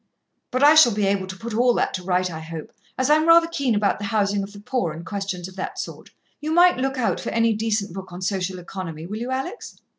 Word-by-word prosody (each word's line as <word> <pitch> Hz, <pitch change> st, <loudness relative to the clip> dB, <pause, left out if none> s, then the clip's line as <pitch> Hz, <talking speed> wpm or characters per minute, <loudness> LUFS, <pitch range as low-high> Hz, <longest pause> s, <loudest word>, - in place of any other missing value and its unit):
"But 255 Hz, +2 st, 0 dB
I 295 Hz, +1 st, +8 dB
shall 310 Hz, -8 st, +7 dB
be 210 Hz, -1 st, +1 dB
able 195 Hz, -1 st, 0 dB
to 190 Hz, 0 st, -8 dB
put 230 Hz, +3 st, -6 dB
all 245 Hz, +2 st, +3 dB
that -, -, 0 dB
right, 180 Hz, 0 st, +1 dB
I 160 Hz, -, -6 dB
hope, 160 Hz, 0 st, -8 dB, 0.3 s
as 260 Hz, -, +1 dB
I'm 310 Hz, +1 st, +4 dB
rather 335 Hz, 0 st, +7 dB
keen 280 Hz, -8 st, -1 dB
about 205 Hz, -1 st, +1 dB
the 205 Hz, -, -4 dB
housing 200 Hz, -1 st, +1 dB
of 195 Hz, +1 st, -6 dB
the 205 Hz, -, -11 dB
poor, 205 Hz, -6 st, -2 dB
and 165 Hz, +2 st, -9 dB
questions 190 Hz, -2 st, -4 dB
of 190 Hz, -, -13 dB
that 185 Hz, -, -5 dB
sort. -, -, -7 dB, 0.3 s
You 305 Hz, +1 st, -3 dB
might 350 Hz, 0 st, +5 dB
look 265 Hz, +1 st, -1 dB
out 250 Hz, -, 0 dB
for -, -, -4 dB
any 230 Hz, 0 st, +2 dB
decent 215 Hz, -3 st, -1 dB
book 190 Hz, -1 st, -8 dB
on 180 Hz, +1 st, -7 dB
social 190 Hz, -1 st, -2 dB
economy, 175 Hz, -3 st, -7 dB
will 205 Hz, +5 st, -5 dB
you, 240 Hz, +3 st, -4 dB
Alex?" 270 Hz, -, -5 dB
205 Hz, 245 wpm, -23 LUFS, 185-255 Hz, 0.3 s, I